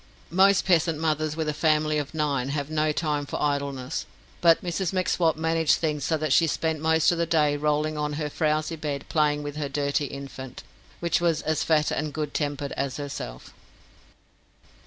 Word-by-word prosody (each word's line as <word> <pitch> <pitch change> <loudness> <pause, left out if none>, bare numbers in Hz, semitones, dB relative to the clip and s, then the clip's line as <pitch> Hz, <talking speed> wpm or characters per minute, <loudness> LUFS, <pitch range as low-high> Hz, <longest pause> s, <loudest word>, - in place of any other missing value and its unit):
Most 195 +2 +4
peasant 165 -3 +3
mothers 155 -1 0
with 160 -1 -2
a 150 - 0
family 155 -1 +2
of 145 +2 -6
nine 140 -4 0
have 145 +1 -3
no 155 0 +1
time 150 -2 -1
for - - -4
idleness, 140 -3 -2 0.3
but 165 -1 +5
Mrs 175 0 -1
M'Swat 180 -4 +1
managed 160 -1 +2
things 150 -3 -2
so 160 - +1
that 155 -2 0
she 165 - +5
spent 160 0 -1
most 160 +1 +3
of 170 - -1
the 170 - +1
day 150 -3 +3
rolling 150 +1 0
on 150 0 -1
her 150 0 -2
frowsy 155 +2 0
bed 145 -3 -4
playing 150 -2 +1
with 145 0 -6
her 145 -2 -2
dirty 140 +1 0
infant, 135 -2 -8 0.4
which 170 0 +1
was 165 -3 +1
as 155 0 0
fat 155 -2 +2
and 150 -1 -2
good 150 -2 -3
tempered 145 -1 -2
as 135 -1 -3
herself. 135 - -7
150 Hz, 180 wpm, -26 LUFS, 145-160 Hz, 0.4 s, but